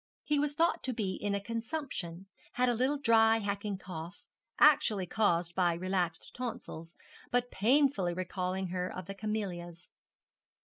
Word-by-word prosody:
He 295 -1 +1
was 295 0 0
thought 330 +3 +2
to 260 - -1
be 200 -5 -1
in 205 +1 -2
a - - 0
consumption 225 - -4 0.3
had 250 0 +2
a 245 - +3
little 260 +5 +1
dry 225 -4 +5
hacking 200 -1 -2
cough, 175 -2 -8 0.3
actually 285 -10 +5
caused 175 -3 +1
by 175 -2 +2
relaxed 180 0 -2
tonsils, 215 -9 -6 0.3
but 245 0 0
painfully 225 -5 +3
recalling 185 0 -2
her 180 0 -2
of 185 - -6
the 195 - -6
camelias. 190 -5 -4
200 Hz, 145 wpm, -32 LUFS, 180-245 Hz, 0.3 s, dry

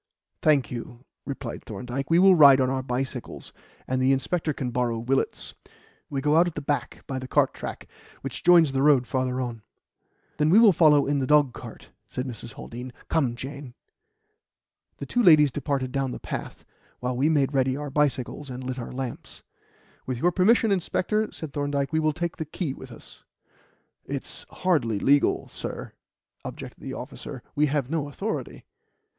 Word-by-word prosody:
"Thank 145 -5 +3
you," 120 +1 -7 0.2
replied 135 -4 -5
Thorndyke. 125 +6 -5
"We 165 - +4
will 190 +1 +7
ride 140 -5 +8
on 130 0 +2
our 135 0 -1
bicycles, 130 0 -5 0.3
and 130 0 0
the 130 +1 +4
inspector 155 +4 0
can 130 -3 -4
borrow 120 -1 0
Willett's. 130 +4 -1 0.6
We 135 -1 -2
go 150 +2 +3
out 175 +2 +5
at 175 - -5
the - - -2
back 140 -4 -3
by 130 -1 -4
the 130 - -7
cart - - +2
track, - - -7 0.3
which - - -6
joins 170 -4 +6
the 135 0 0
road 140 -3 +5
farther 130 0 -1
on." 120 -3 -4 0.8
"Then 150 0 +2
we 185 - +6
will 225 -4 +7
follow 150 -4 +5
in 140 0 +1
the 130 - -1
dogcart," 150 -4 0 0.2
said 125 - -4
Mrs. 120 -2 -8
Haldean. 125 +2 -8 0.2
"Come, 135 -7 +1
Jane." 135 0 -8 1.2
The - - -6
two 245 - 0
ladies 155 - +7
departed 140 -2 -2
down 135 -1 -1
the - - -6
path, - - -6 0.3
while 125 0 -2
we 140 +5 +2
made 145 -3 +2
ready 130 -1 +1
our 145 -1 -5
bicycles 140 -1 -1
and 130 0 -6
lit 130 0 -4
our 120 - -6
lamps. 130 -2 -7 0.6
"With 130 -2 -2
your 175 +9 +2
permission, 215 +5 +3
inspector," 205 +3 0
said 160 -5 -8
Thorndyke, 145 0 -1
"we 160 - +3
will 155 0 +2
take 170 +2 -4
the 160 - -3
key 155 -2 -4
with 130 -1 -11
us." 115 - -12 0.8
"It's - - -6
hardly 145 - 0
legal, 140 +7 +2
sir," - - -7 0.5
objected - - -8
the - - -6
officer. - - -8
"We 150 +1 +2
have 140 -3 0
no 155 -3 -1
authority." 210 +9 -5
140 Hz, 175 wpm, -26 LUFS, 130-155 Hz, 1.2 s, ride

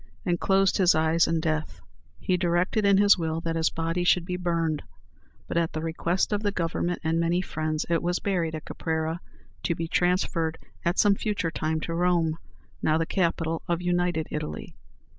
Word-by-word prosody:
and 175 -2 +1
closed 195 0 +2
his 185 -3 +5
eyes 160 +1 +3
in 165 0 +1
death. 155 - -2 0.4
He 185 - +1
directed 180 +4 +1
in 200 -1 +5
his 205 -1 +6
will 160 -1 -1
that 165 0 -2
his 165 0 +2
body 165 +2 -2
should 175 -1 +3
be 180 - -3
burned; 165 -4 -1 0.7
but, - - -2
at 165 -1 +1
the 155 - -3
request 170 +5 0
of 205 - 0
the 205 -1 0
Government 175 -1 -1
and 165 +1 +1
many 170 +1 +2
friends, 155 -3 -2
it 170 -1 +1
was 175 +1 0
buried 170 -5 -1
at 155 - -7
Caprera, 160 +1 -2 0.4
to 170 - 0
be 165 0 -3
transferred 170 -2 +1 0.3
at 170 +3 0
some 205 -1 +5
future 200 -5 -2
time 155 0 -1
to 165 - -3
Rome, 170 -2 +1 0.4
now 155 0 +2
the 165 - 0
capital 165 -3 0
of 170 -1 0
united 175 -2 0
Italy. 75 - -5
170 Hz, 185 wpm, -26 LUFS, 160-180 Hz, 0.7 s, his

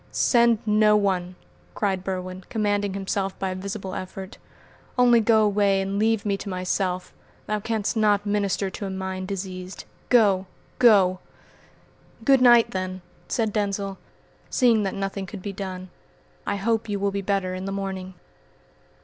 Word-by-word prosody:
"Send 235 -2 +4
no 210 0 +4
one," 185 -3 0 0.4
cried 190 -3 -1
Berwin, 185 -1 -4
commanding 205 -3 0
himself 195 0 -2
by 190 - -2
a - - -4
visible 195 0 -5
effort. 190 +1 -7 0.6
"Only 245 -1 +6
go 220 0 +4
away 200 -1 +2
and 195 +1 -2
leave 220 -1 +1
me 200 -1 0
to 200 - -7
myself. 185 0 -2 0.3
'Thou 215 0 -1
can'st 220 0 -2
not 205 -1 +3
minister 200 -1 0
to 200 - -5
a - - -4
mind 190 0 -4
diseased.' 185 -1 -6 0.2
Go! 200 -6 +4 0.3
go!" 195 -7 +5 1.1
"Good 270 -2 +5
night, 240 -2 +6
then," 185 -1 -4 0.2
said 220 -3 -1
Denzil, 200 -2 -2 0.5
seeing 235 -4 +3
that 195 -2 -2
nothing 195 0 -3
could 195 -2 -9
be 200 - -4
done. 185 -2 -6 0.6
"I - - 0
hope 225 +2 -1
you 200 -1 -1
will 200 0 0
be 200 0 -2
better 195 -1 -1
in 185 +1 -5
the 195 - -3
morning." 190 -1 -5
195 Hz, 155 wpm, -24 LUFS, 190-210 Hz, 1.1 s, Only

